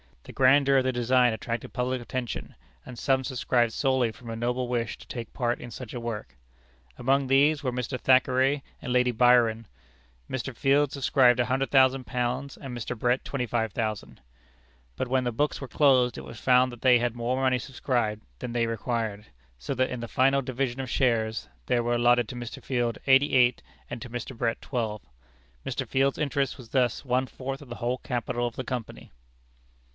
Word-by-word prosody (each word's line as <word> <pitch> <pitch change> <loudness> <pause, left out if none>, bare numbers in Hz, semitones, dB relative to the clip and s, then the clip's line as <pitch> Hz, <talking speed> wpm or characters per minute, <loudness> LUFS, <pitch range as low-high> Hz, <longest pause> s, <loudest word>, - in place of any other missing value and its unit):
The - - -11
grandeur 135 +1 +5
of 130 - +3
the 130 - +1
design 120 0 +3
attracted 115 +1 -5
public 125 0 -1
attention, 120 -1 -5 0.3
and 125 - -9
some 130 +1 +1
subscribed 120 -2 0
solely 130 -4 +1
from 115 +2 -12
a 115 - -4
noble 125 +2 -1
wish 120 -2 -2
to - - -15
take 115 -3 -7
part 120 -1 -1
in 120 - -8
such 120 0 -8
a 120 - -4
work. 105 - -6 0.6
Among 135 +2 +1
these 145 +3 +4
were 130 - 0
Mr. 125 +1 -3
Thackeray 130 +2 +3 0.2
and 125 - -3
Lady 125 0 +3
Byron. 115 -2 +3 0.6
Mr. 130 0 -4
Field 140 +2 +2
subscribed 130 -3 +3
£100,000, 130 0 +1
and 130 -3 -7
Mr. 120 +1 -5
Brett 125 +3 +1
£25,000. 115 -4 -3 0.8
But 130 - -2
when 130 +1 +1
the 120 - -1
books 145 +6 -1
were 135 - -6
closed, 130 -4 +3
it - - -7
was 115 - -10
found 125 0 +4
that 120 - -11
they 125 -2 +6
had 120 0 -1
more 120 +1 -1
money 130 -1 +2
subscribed 120 -4 -2 0.2
than 120 - -5
they 120 -1 +1
required, 115 -2 -3 0.3
so - - -4
that 130 +1 +1
in 125 - -4
the 115 - -5
final 135 +3 +3
division 130 -1 -3
of 130 -1 -4
shares, 115 - 0 0.2
there 120 - +1
were 120 +1 +1
allotted 120 -1 +3
to - - -7
Mr. 120 -1 -7
Field 120 -3 -1
eighty 135 +2 +4
eight, 125 -1 +4 0.3
and 120 - -6
to 125 - -7
Mr. 120 +2 -6
Brett 115 0 -1
twelve. 110 -5 -3 0.6
Mr. - - -3
Field's 135 +1 +1
interest 140 -3 -1
was 120 -3 -12
thus 125 -3 +1
one 130 +1 +1
fourth 135 +2 -6
of 140 - -13
the 120 - -6
whole 120 +2 -2
capital 120 -1 -2
of 120 - -7
the 130 - -4
Company. 125 -3 -6
125 Hz, 185 wpm, -27 LUFS, 120-130 Hz, 0.8 s, they